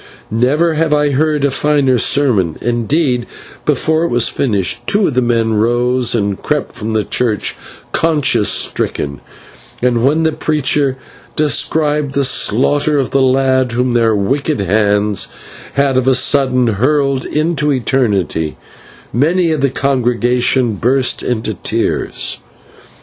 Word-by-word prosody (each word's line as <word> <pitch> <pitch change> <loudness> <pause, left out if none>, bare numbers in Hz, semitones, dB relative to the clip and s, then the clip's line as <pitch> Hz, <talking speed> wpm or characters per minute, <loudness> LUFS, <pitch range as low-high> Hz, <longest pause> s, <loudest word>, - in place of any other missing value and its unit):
Never 145 +9 +1
have 155 -1 +1
I 150 -1 +1
heard 150 +1 +1
a 140 - +1
finer 140 -3 +1
sermon; 110 - +2
indeed, 120 +2 -1 0.4
before 155 +3 +1
it - - +1
was 120 -1 +1
finished, 105 -3 -1
two 205 0 +2
of 150 - 0
the 125 - +1
men 115 -2 0
rose 120 +3 +1
and 100 -3 -2
crept 150 -2 -2
from 110 -2 -5
the 110 -1 +1
church 110 -3 -1 0.4
conscience 140 -9 +1
stricken, 70 -1 -1 0.6
and 120 -1 +1
when 150 +5 +2
the 160 - +2
preacher 145 -3 0 0.4
described 150 -1 0
the 140 - +2
slaughter 145 +4 +1
of 135 -3 -1
the 135 - +2
lad 130 -1 +2
whom 125 +1 0
their 115 -2 +2
wicked 135 +8 -1
hands 105 0 +1 0.5
had 140 -2 +1
of 130 0 0
a 130 - +4
sudden 130 -1 +2
hurled 135 +5 +1
into 150 -1 -1
eternity, 105 - -1 0.6
many 165 - +1
of 155 -3 -1
the 140 - +2
congregation 125 -3 0
burst 130 +5 +1
into 110 -2 -2
tears. 95 - -3
130 Hz, 135 wpm, -15 LUFS, 115-145 Hz, 0.6 s, a